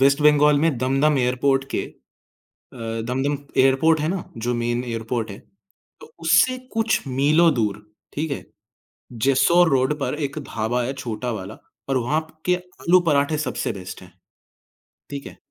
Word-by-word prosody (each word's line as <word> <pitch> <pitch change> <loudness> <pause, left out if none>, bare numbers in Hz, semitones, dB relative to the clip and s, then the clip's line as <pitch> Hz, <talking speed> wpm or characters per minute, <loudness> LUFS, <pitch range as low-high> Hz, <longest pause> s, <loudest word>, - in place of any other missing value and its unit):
Waste 140 +2 +4
Bengal 150 -1 +5
में 160 -5 +2
Dumdum 135 +3 +2
airport 130 +2 +1
के - - 0 0.7
अ, 115 -2 -7
Dumdum 135 +3 -1 0.2
airport 135 +5 +4
है 150 - 0
ना? 185 +1 -2
जो 120 +2 -1
मेन 120 +1 -1
एयरपोर्ट 115 -1 -3
है, 100 - -9 0.6
तो - - -14
उससे 175 +10 +4
कुछ 225 -8 0
मीलों 150 +6 +3
दूर, 105 -3 -2 0.3
ठीक 155 +2 -3
है? 140 - -4 0.8
जेसौर 170 +6 +4
रोड 130 0 +2
पर 145 - -2
1 140 - -7
ढाबा 115 +3 -1
है, 130 - -2
छोटा 125 -2 -4
वाला 105 -1 -6 0.3
और 135 - +2
वहाँ 140 +6 +1
प 160 0 -18
के 180 0 +3
आलू 180 0 +1
पराठे 150 -2 +1
सबसे 130 -6 -2
बेस्ट 90 -2 -8
हैं। 90 -1 -14 1.0
ठीक 140 -1 -6
है? - - -10
135 Hz, 160 wpm, -22 LUFS, 120-155 Hz, 1.0 s, Bengal